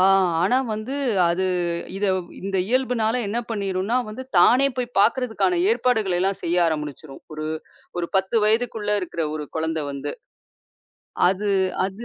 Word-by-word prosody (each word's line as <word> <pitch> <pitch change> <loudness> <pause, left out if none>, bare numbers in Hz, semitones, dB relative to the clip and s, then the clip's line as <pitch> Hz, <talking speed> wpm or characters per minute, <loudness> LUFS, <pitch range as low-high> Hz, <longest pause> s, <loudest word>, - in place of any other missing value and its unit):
ஆ - - +5 0.4
ஆனா 245 +8 +3
வந்து, 215 +5 -4 0.3
அது 175 +2 0 0.5
இத 205 - -2 0.4
இந்த 195 0 -2
இயல்புனால 250 -3 +1
என்ன 225 - -1
பண்ணிடும்னா, 200 +1 -1
வந்து 215 +5 -6 0.2
தானே 250 +9 +6
போய்ப் 245 -1 -4
பாக்குறதுக்கான 255 - +2
ஏற்பாடுகள 220 - +1
எல்லாம் 195 +1 0
செய்ய 170 +1 0
ஆரம்பிச்சிடும். 150 -2 -5
ஒரு 155 0 -4 0.5
ஒரு 170 -1 -2
10 190 +4 +1
வயதுக்குள்ள 220 -1 +1
இருக்குற 170 -3 -3
ஒரு 150 -1 -5
குழந்தை 160 -1 -1
வந்து. 140 +1 -4 1.2
அது 200 +2 0 0.4
அது 200 +5 -8
200 Hz, 135 wpm, -23 LUFS, 170-235 Hz, 1.2 s, தானே